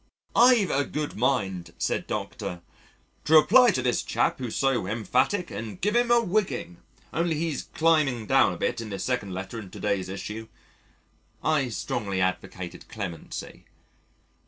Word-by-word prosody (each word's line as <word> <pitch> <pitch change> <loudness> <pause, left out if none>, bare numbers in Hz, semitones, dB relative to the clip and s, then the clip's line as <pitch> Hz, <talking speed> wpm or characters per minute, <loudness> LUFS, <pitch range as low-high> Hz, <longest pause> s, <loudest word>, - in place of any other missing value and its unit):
"I've 240 -5 +6
a 140 - +2
good 150 +1 -4
mind," 95 -9 -1
said - - -1
Dr., 85 -1 -4 0.6
"to 160 - +1
reply 240 +11 +7
to 130 - 0
this 125 -1 +1
chap - - 0
who's 125 -4 -4
so 135 -8 +1
emphatic 120 - 0
and 105 -1 -6
give 210 +4 0
him 240 0 +3
a 240 0 +6
whigging 185 - -1 0.4
only 170 0 +1
he's 155 -3 -2
climbing 155 -8 +2
down 130 -4 +4
a 90 - -5
bit 115 - -1
in 110 - -7
this 100 -2 -4
second 125 -7 -1
letter 95 +5 -5
in 100 -4 -9
to - - -10
day's 95 -2 -1
issue." 105 +3 -6 1.0
I 150 -5 +2
strongly 100 -4 -3
advocated 95 -1 -3
clemency. 100 -8 -7
125 Hz, 155 wpm, -26 LUFS, 100-160 Hz, 1.0 s, reply